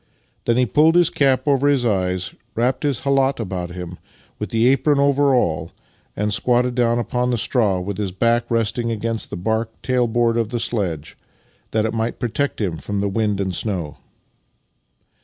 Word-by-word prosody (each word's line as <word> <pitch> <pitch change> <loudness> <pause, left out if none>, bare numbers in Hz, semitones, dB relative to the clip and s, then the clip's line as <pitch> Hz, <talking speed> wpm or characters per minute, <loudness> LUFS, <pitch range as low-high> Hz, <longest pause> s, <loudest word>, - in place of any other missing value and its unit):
Then 115 0 +2
he 125 - +4
pulled 155 +8 +4
his 175 -2 +4
cap 135 -1 +2
over 140 0 +3
his 140 -4 +2
eyes, 95 -4 0 0.2
wrapped 125 +3 0
his 140 -5 -1
khalat 135 -1 +2
about 90 -5 -4
him, 90 0 -8 0.4
with - - -4
the 120 +4 +4
a])ron 145 +2 +1
over 140 -1 +3
all, 80 -8 0 0.4
and 105 0 -1
squatted 125 +3 +2
down 120 -1 +2
upon 125 +2 -1
the 120 - +1
straw 110 -4 +1
with 100 +2 -5
his 100 -3 -2
back 115 +5 +1
resting 115 +1 0
against 115 0 -3
the - - -5
bark 110 +4 -1
tail 125 -2 +1
board 115 0 +1
of 115 -2 -1
the 120 0 -2
sledge, 85 -11 -2 0.5
that 110 0 0
it 110 - -2
might 115 +1 -2
protect 125 +4 -2
him 90 -7 -2
from 100 -1 -3
the 100 0 0
wind 105 -1 0
and 95 -2 -1
snow. 85 -5 -3
115 Hz, 180 wpm, -21 LUFS, 100-125 Hz, 0.5 s, he